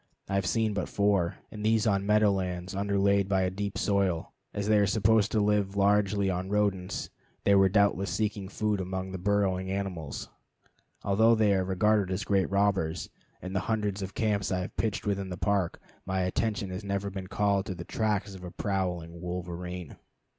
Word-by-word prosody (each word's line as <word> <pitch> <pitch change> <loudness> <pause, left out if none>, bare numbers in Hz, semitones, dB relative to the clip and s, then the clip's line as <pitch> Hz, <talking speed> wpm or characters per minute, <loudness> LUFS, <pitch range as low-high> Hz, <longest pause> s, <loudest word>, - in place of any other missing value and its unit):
I 95 - -4
have 100 -2 +1
seen 110 0 +1
but 100 -3 -2
four, 100 -4 +1 0.2
and 105 -1 -7
these 110 0 +3
on 100 -2 +1
meadow 105 0 +5
lands 90 -1 -3
underlaid 100 0 +2
by 95 -1 +2
a 90 - 0
deep 100 +1 -4
soil. 100 -5 0 0.2
As 100 0 -3
they 105 -1 +5
are 100 - +3
supposed 110 +1 +3
to 110 - +2
live 105 -1 +1
largely 100 0 +3
on 95 0 -2
rodents, 100 -3 -1 0.3
they 100 - +4
were 95 -1 +6
doubtless 100 -1 +2
seeking 105 -3 -1
food 105 -2 -1
among 95 0 -4
the 95 - -5
burrowing 95 -1 +1
animals. 95 -7 -4 0.8
Although 110 +4 +4
they 110 -2 +3
are 95 -1 +2
regarded 95 +1 +2
as 95 +2 -1
great 100 -2 +1
robbers, 95 -5 0 0.3
in 95 +1 -5
the 95 - +1
hundreds 105 -3 0
of 95 0 -6
camps 105 -4 0
I 90 0 0
have 90 - -6
pitched 110 -3 -1
within 100 -2 -1
the 90 - -5
Park 100 -4 0 0.2
my 95 0 -1
attention 100 +1 -1
has 95 +3 -5
never 100 0 -2
been 95 -1 -6
called 100 0 +1
to 95 - -3
the 85 0 -7
tracks 105 -3 -1
of 95 -1 -10
a 90 - -6
prowling 90 -4 -3
wolverene. 90 -1 -5
100 Hz, 190 wpm, -29 LUFS, 95-105 Hz, 0.8 s, were